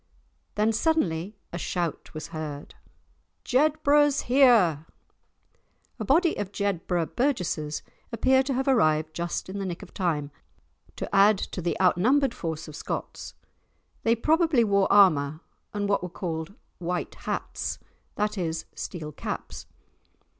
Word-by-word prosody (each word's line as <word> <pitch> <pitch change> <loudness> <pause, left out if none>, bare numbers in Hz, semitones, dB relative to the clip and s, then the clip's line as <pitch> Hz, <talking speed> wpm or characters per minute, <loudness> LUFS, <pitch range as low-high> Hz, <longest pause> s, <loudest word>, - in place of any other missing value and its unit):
Then 215 +2 +2
suddenly 210 - 0 0.2
a 175 - -3
shout 170 -2 -3
was 155 - -6
heard. 150 -2 -6 0.7
"Jedburgh's 290 +1 +3
here!" 230 - +4 1.1
A - - -2
body 320 - +3
of 205 -2 -3
Jedburgh 180 -4 -1
burgesses 180 - -1 0.3
appear 260 +3 +3
to 270 +1 -2
have 265 +2 -1
arrived 155 - +3
just 170 +1 -3
in 195 +2 -5
the 195 - -3
nick 175 -1 -5
of - - -14
time 150 -6 -1 0.6
to - - -4
add 200 +1 +6
to 185 - -5
the 175 - -2
outnumbered 235 +9 +3
force 165 -5 -5
of 155 - -9
Scots. - - -5 0.7
They 230 +1 +3
probably 310 +1 +3
wore 200 -2 +2
armour 155 -7 +4 0.3
and 205 -1 -2
what 200 - +1
were 180 - -5
called 165 +1 -5 0.2
"white 180 0 -3
hats," - - -4 0.4
that 210 -1 -1
is 165 -2 -2
steel 155 -4 -6
caps. - - -6
195 Hz, 130 wpm, -26 LUFS, 165-245 Hz, 1.1 s, add